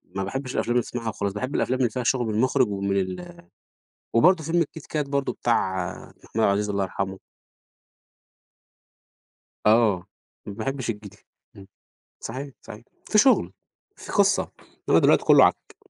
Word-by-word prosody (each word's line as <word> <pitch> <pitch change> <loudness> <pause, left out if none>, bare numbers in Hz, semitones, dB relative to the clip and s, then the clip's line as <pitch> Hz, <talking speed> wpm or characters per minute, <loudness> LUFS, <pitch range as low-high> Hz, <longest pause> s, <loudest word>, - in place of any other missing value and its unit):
ما 95 - -1
باحبش 130 +6 -4
الأفلام 120 - -1
اللي 120 - +3
تسمعها 115 -2 -5
وخلاص 100 -2 -3
باحب 130 +7 -4
الأفلام 130 +1 0
اللي 120 -3 +2
فيها 125 +1 -3
شغل 120 -1 +1
من 110 - -2
المخرج 130 +2 +2
ومن 100 0 -1
ال 170 - -4 0.7
وبرضه 160 +7 +4
فيلم 170 +2 +1
الكيت 160 0 -5
كات 150 -3 -2
برضه 140 -1 -1
بتاع 95 -6 0
محمود - - -19 0.2
عبد - - 0
العزيز 105 +1 0
الله 100 -1 0
يرحمه. 95 0 -4 2.5
آه، 105 -5 +3 0.4
ما 100 - -6
باحبش 130 +3 -4
الجديد 105 -2 -6 0.4
إمم، 95 -1 -13 0.5
صحيح، 140 +2 -6
صحيح. 110 +3 -12 0.3
في 215 - +3
شغل، 260 +4 +4 0.4
في - - -9
قصة، - - +2 0.4
إنما - - +5
دلوقتي - - +4
كله - - +7
عك. - - -1
115 Hz, 155 wpm, -24 LUFS, 100-135 Hz, 2.5 s, كله